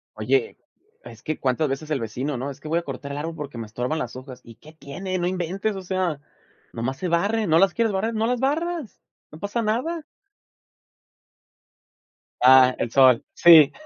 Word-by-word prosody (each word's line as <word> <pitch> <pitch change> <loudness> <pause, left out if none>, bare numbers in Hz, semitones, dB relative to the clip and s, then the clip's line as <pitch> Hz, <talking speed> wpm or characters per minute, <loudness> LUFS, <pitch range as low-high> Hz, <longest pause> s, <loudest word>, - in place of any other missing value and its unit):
Oye, 435 +3 0 0.5
es - - -13
que, 155 - -3
¿cuántas 135 +3 0
veces 135 +3 -4
el 145 - 0
vecino, 125 +6 -4
no?: 135 +3 -4
“Es 135 - -12
que 155 - -10
voy 165 +2 +1
a - - -6
cortar 140 -1 -7
el 140 - -5
árbol 160 +3 -4
porque 145 -5 -7
me 115 - -5
estorban 125 +8 -3
las 120 - -5
hojas". 130 -1 -10
¿Y 115 - -14
qué 155 +6 -17
tiene? 185 +5 -5
No 175 -1 -1
inventes, 185 +4 -2
o 190 - -6
sea, 185 -4 -2 0.5
nomás 130 +3 -3
se 185 - -3
barren. 200 +4 0
¿No 160 +1 +5
las 190 -1 +4
quieres 230 -3 0
barrer? 215 +4 -1
No 220 0 0
las 250 0 0
barras, 310 - -2 0.3
no 155 - -12
pasa 205 +5 -2
nada. 255 +10 -2 2.4
Ah, 130 0 +7
el 120 - -1
sol, 130 -2 +5
sí. 160 -4 +7
160 Hz, 190 wpm, -23 LUFS, 135-205 Hz, 2.4 s, Ah